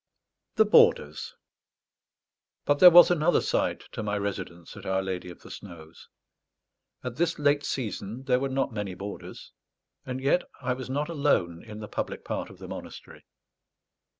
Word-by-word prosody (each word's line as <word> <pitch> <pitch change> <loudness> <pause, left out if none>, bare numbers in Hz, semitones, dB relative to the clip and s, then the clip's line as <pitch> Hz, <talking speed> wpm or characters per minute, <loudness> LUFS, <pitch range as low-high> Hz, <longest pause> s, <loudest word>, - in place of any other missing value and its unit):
THE 220 - +5
BOARDERS 460 - +3 1.3
But 145 0 +2
there 180 - +11
was 175 +1 +8
another 175 0 +3
side - - 0
to - - -5
my 105 -1 -2
residence 90 -4 -5
at - - -10
Our 95 0 0
Lady 90 -1 -4
of 85 - -13
the - - -12
Snows. 85 -4 -12 0.9
At 125 -1 -5
this 170 0 +1
late 145 0 +2
season 115 -1 -4
there 125 -1 +2
were 135 +1 -1
not 135 -2 -1
many 105 -3 -4
boarders; 100 +2 -8 0.5
and 130 0 -5
yet 140 +7 +2 0.2
I 130 -1 -1
was 130 0 -7
not 145 +3 -1
alone 140 - 0
in 110 -1 -9
the 105 - -6
public - - -5
part - - -3
of - - -14
the - - -10
monastery. - - -10
125 Hz, 160 wpm, -27 LUFS, 100-145 Hz, 1.3 s, there